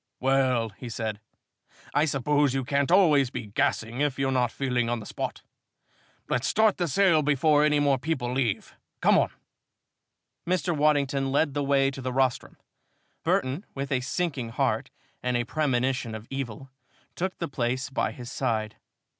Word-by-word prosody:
"Well," 130 -3 +2
he 120 +4 -9
said, 110 -2 -3 0.7
"I 150 - +3
suppose 145 -1 +1
you 135 -2 -1
can't 140 +1 +1
always 155 -9 +5
be 120 -2 -5
gassing 115 +4 -1
if 145 -2 0
you're 135 -1 0
not 125 -3 +1
feeling 125 -3 -1
on 120 0 -1
the 105 - -9
spot. - - -5 0.8
Let's 125 - 0
start 220 -1 +3
the 175 - 0
sale 170 +1 +4
before 150 +1 +3
any 150 -1 +3
more 140 -2 +2
people 130 -4 -2
leave. 125 -6 -1 0.3
Come - - +5
on." - - +1 1.2
Mr. 180 -1 0
Waddington 140 -2 +2
led 145 +1 +2
the 145 - -1
way 135 -1 +3
to 135 - -8
the 130 0 -3
rostrum. 130 -1 0 0.7
Burton, 130 +8 0
with 140 0 -4
a 130 - +2
sinking 140 -3 -2
heart, 115 - 0 0.3
and 125 -1 0
a 120 - 0
premonition 130 -4 -1
of 110 0 -8
evil, 135 -1 -5 0.4
took 185 +2 -3
the 170 - -3
place 130 0 -2
by 135 - 0
his 120 -1 -9
side. 110 -2 -2
135 Hz, 165 wpm, -27 LUFS, 125-145 Hz, 1.2 s, always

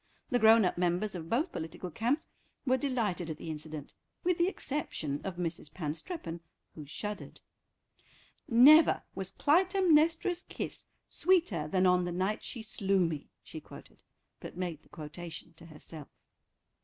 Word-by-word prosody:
The 245 - +3
grown 220 -1 +7
up 180 - -1
members 180 +4 +1
of 165 -3 -6
both 300 +9 +1
political 165 +3 -6
camps 245 - 0 0.4
were 260 -1 +4
delighted 230 - -1
at 155 - -4
the 160 - -6
incident—with 155 - -5
the 345 - +4
exception 215 - -2
of 190 -2 -4
Mrs. 165 -3 -4
Panstreppon, 165 - -5 0.3
who 150 -3 -9
shuddered. 210 +8 -6 1.1
"Never 285 +7 +7
was 190 -1 -4
Clytemnestra's 340 0 +3
kiss - - -6 0.2
sweeter 325 - +2
than 185 +4 +2
on 180 -1 +4
the 175 - -2
night 190 +4 -1
she 235 -4 -5
slew 195 -2 +1
me," 155 -3 -4
she 160 - -9
quoted, - - -14 0.4
but - - -9
made 175 -4 -3
the - - -26
quotation 165 +1 -8
to 165 - -12
herself. 155 -1 -9
185 Hz, 145 wpm, -31 LUFS, 165-270 Hz, 1.1 s, grown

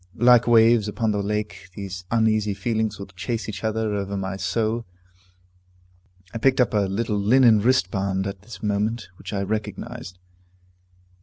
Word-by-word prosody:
Like 120 0 +5
waves 115 -2 +5
upon 110 +1 -1
the 105 -1 -1
lake, 105 -2 -4
these 95 -2 -7
uneasy 110 -3 +1
feelings 110 +1 -1
will 100 - -7
chase 100 +3 -4
each 100 -1 -6
other 110 -1 -1
over 100 0 -3
my 95 0 -3
soul. 110 +5 -1 1.5
I 115 - -4
picked 130 +3 +3
up 125 - +3
a 100 -2 +1
little 105 +1 -1
linen 115 +1 +5
wristband 95 -4 +1
at 100 -1 -5
this 105 -2 -12
moment, 105 +1 -1
which - - -8
I 100 -2 -1
recognized. 100 -3 -5
105 Hz, 150 wpm, -23 LUFS, 100-115 Hz, 1.5 s, Like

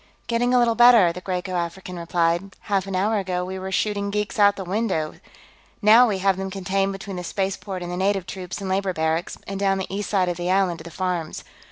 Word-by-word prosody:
"Getting 240 +1 +1
a 250 - +4
little 240 -1 +4
better," 230 -7 +6
the 180 - -8
Graeco 180 0 -3
African 180 +1 -4
replied. 170 +2 0
"Half 195 -2 -1
an 195 - -3
hour 210 +3 +1
ago, 180 -2 -2
we 190 +1 -5
were 190 0 -5
shooting 200 0 0
geeks 210 +2 -2
out 205 0 +6
the 195 - -5
windows, 185 -5 -1
here; - - -21 0.6
now 225 +3 +7
we 205 -4 0
have 190 0 +2
them 190 0 -3
contained 195 +1 -1
between 195 -1 -7
the 180 - -5
spaceport 190 0 -3
and 175 - -5
the 180 - -3
native 195 -1 +1
troops 185 0 -6
and 195 - -5
labor 190 0 0
barracks, 160 +1 -1
and 195 0 -5
down 195 -1 +2
the 190 0 -4
east 205 0 -3
side 190 -3 +2
of 175 -1 -2
the 175 0 -2
island 185 -3 +2
to - - -9
the 170 - -9
farms. 175 -2 -3
190 Hz, 235 wpm, -23 LUFS, 180-200 Hz, 0.6 s, now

